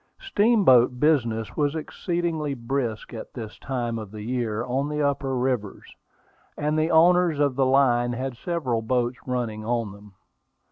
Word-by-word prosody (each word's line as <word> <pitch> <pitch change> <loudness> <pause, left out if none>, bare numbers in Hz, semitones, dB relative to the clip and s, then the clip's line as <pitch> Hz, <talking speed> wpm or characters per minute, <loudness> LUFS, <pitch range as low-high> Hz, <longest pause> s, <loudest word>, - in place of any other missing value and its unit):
Steamboat 200 - +4
business 120 -8 +1
was 145 0 0
exceedingly 160 -2 -2
brisk 120 -2 -3
at 115 - -8
this 110 -4 -8
time 120 -4 -3
of 110 -2 -8
the 105 +1 -8
year 120 -1 -2
on 135 +3 -1
the 150 0 -3
upper 140 -2 0
rivers, 125 -6 -3 0.6
and 150 +1 0
the 155 +1 +1
owners 175 0 +4
of 140 -3 +2
the 135 0 +2
line 120 -3 +3
had 130 +1 -4
several 130 -6 -2
boats 120 +1 -1
running 120 -4 -2
on 115 -2 -1
them. 100 0 -15
130 Hz, 150 wpm, -25 LUFS, 115-150 Hz, 0.6 s, Steamboat